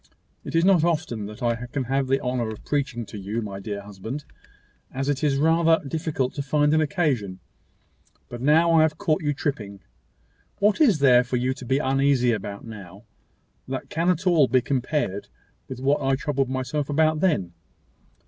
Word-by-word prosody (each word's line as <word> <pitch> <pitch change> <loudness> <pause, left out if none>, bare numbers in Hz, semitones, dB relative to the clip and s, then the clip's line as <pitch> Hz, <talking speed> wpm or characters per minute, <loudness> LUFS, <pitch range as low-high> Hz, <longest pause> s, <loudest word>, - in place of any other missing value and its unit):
It - - -6
is 165 +1 +3
not 185 -4 +4
often 155 -11 -1
that 105 +5 -9
I 120 +1 -1
can 135 +2 -3
have 135 +2 -1
the 135 +1 +2
honour 125 -3 -2
of 110 - -9
preaching 135 -5 -2
to 105 - -9
you, 105 +4 -3
my 100 -2 -6
dear 100 0 -5
husband, 105 +8 -7 0.7
as 135 +1 -3
it 145 +1 -1
is 145 -2 +2
rather 165 +2 +3
difficult 145 -3 -2
to 145 - -4
find 145 +2 +2
an 155 - +3
occasion; 140 - -1 0.9
but 120 0 -8
now 160 +5 +4
I 160 - +6
have 155 -1 +1
caught 155 +3 0
you 145 -2 0
tripping. 115 -9 -4 0.8
What 205 +7 +2
is 230 - +5
there 125 -3 +5
for 125 +1 -2
you 130 +2 0
to 130 - -10
be 130 +2 +1
uneasy 135 -2 +2
about 100 -1 -5
now, 100 -3 -11 0.6
that 130 0 -5
can 165 +2 0
at 180 +1 0
all 165 -7 +4
be 130 - +3
compared 125 -4 -2 0.4
with 130 -2 -7
what 140 +3 +1
I 135 0 +2
troubled 135 -1 -1
myself 130 +3 -2
about 155 +1 +2
then? 150 - 0
135 Hz, 185 wpm, -24 LUFS, 120-155 Hz, 0.9 s, I